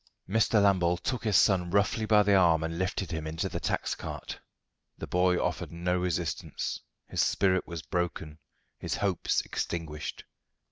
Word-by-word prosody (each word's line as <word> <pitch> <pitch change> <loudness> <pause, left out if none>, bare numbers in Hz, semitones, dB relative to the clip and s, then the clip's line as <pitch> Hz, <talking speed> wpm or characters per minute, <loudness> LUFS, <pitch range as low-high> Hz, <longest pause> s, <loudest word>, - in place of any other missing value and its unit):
Mr. 110 +2 +3
Lambole 90 -4 +3
took 120 +7 -3
his 105 -4 +4
son 90 -4 +3
roughly 100 +3 +1
by 105 -1 +5
the 100 0 +3
arm 85 -4 +4
and 80 +1 -3
lifted 95 0 -2
him 80 -1 -3
into 80 +1 -2
the - - -4
tax - - -1
cart. - - -7 0.6
The - - -5
boy 90 0 +2
offered - - -2
no 90 +2 -1
resistance. 85 -2 -2 0.3
His - - 0
spirit 95 -2 +2
was 85 -2 -6
broken, 80 -3 -3 0.4
his - - -2
hopes 95 -4 0
extinguished. 80 -3 -4
90 Hz, 155 wpm, -29 LUFS, 85-100 Hz, 0.6 s, by